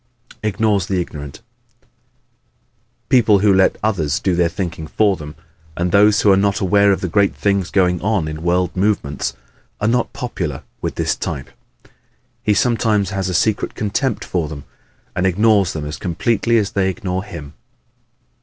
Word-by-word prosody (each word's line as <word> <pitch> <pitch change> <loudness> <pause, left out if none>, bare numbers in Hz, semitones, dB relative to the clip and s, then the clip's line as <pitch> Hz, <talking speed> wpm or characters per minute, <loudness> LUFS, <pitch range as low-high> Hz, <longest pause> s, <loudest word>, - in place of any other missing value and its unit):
Ignores 105 -2 +1
the 95 -2 0
Ignorant 75 -3 -6 1.6
¶ - - -45
People 115 -5 +5
who 100 0 +4
let 95 0 +3
others 90 -6 0
do 95 - 0
their 85 -1 +2
thinking 85 -3 -5
for 105 +3 +2
them 75 -3 -9 0.4
and 90 0 0
those 105 +2 +5
who 105 - +5
are - - +6
not 100 +1 +1
aware 100 +1 +4
of 95 - 0
the 95 - -1
great 100 +3 +2
things 100 -3 0
going 90 -3 +2
on 100 -5 0
in 75 0 -5
world 90 +1 0
movements, 95 -8 -1 0.4
are 105 - 0
not 120 +1 +1
popular 85 - -4 0.2
with - - -3
this - - 0
type. 65 - -5 0.9
He 105 - +2
sometimes 110 -3 +1
has 95 -2 -2
a 90 - -2
secret 105 +4 0
contempt 110 +4 -1
for 85 -4 -1
them 70 -2 -8 0.5
and 90 +1 +1
ignores 100 0 +3
them 75 -2 -4
as 75 +1 -5
completely 110 +6 +1
as 105 -3 0
they 95 -1 +1
ignore 95 -2 -3
him. 80 -8 -9
95 Hz, 165 wpm, -19 LUFS, 85-105 Hz, 1.6 s, are